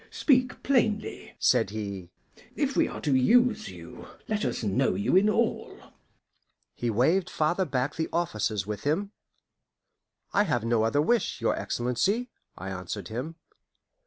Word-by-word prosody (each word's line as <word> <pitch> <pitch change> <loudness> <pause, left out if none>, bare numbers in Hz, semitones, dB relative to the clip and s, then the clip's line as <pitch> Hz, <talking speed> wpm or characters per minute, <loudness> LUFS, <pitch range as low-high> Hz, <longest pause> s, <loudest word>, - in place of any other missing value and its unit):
"Speak 255 -3 +1
plainly," 225 -6 0
said - - +3
he. 100 -4 -6 0.5
"If - - -1
we - - +3
are - - -7
to 145 - +1
use 220 - +3
you, - - -11 0.2
let 215 -1 -1
us - - -2
know 100 -2 +1
you 105 - +1
in 200 +3 +5
all." 225 +1 -1 1.0
He 120 - -2
waved 160 - +2
farther 175 +4 0
back 135 -1 -1
the 160 - -2
officers 110 - -1
with 105 -1 -5
him. 185 +8 0 1.2
"I 205 - +3
have 120 - -1
no 115 -1 +2
other 130 +7 +2
wish, 240 +7 +1
your - - +1
Excellency," 195 - -1 0.3
I 95 +2 -6
answered 95 0 -6
him. 130 +9 -5
145 Hz, 145 wpm, -27 LUFS, -, 1.2 s, in